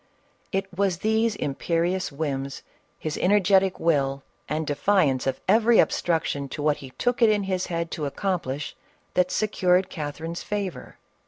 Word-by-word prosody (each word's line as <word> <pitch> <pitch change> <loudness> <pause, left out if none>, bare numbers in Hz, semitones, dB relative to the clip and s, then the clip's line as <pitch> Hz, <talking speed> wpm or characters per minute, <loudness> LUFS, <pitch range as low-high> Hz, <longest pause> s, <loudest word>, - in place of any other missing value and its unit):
It 195 +1 0
was 190 -2 +1
these 220 0 +2
imperious 170 +6 -1
whims, 140 -2 -3 0.3
his 155 -1 -4
energetic 195 -1 +3
will, 140 -4 +1 0.3
and 155 +1 -1
defiance 145 -3 +2
of 135 -1 -1
every 225 +1 +5
obstruction 150 -5 +1
to 145 - -5
what 150 -1 +2
he 135 - -10
took 245 0 0
it 230 - +7
in 210 -1 +2
his 185 -1 -1
head 170 -1 -3
to 150 -3 -2
accomplish, 150 -4 -3 0.4
that 180 0 +2
secured 185 -3 +2
Catherine's 160 +2 -5
favor. 200 -4 -4
170 Hz, 145 wpm, -25 LUFS, 145-195 Hz, 0.4 s, it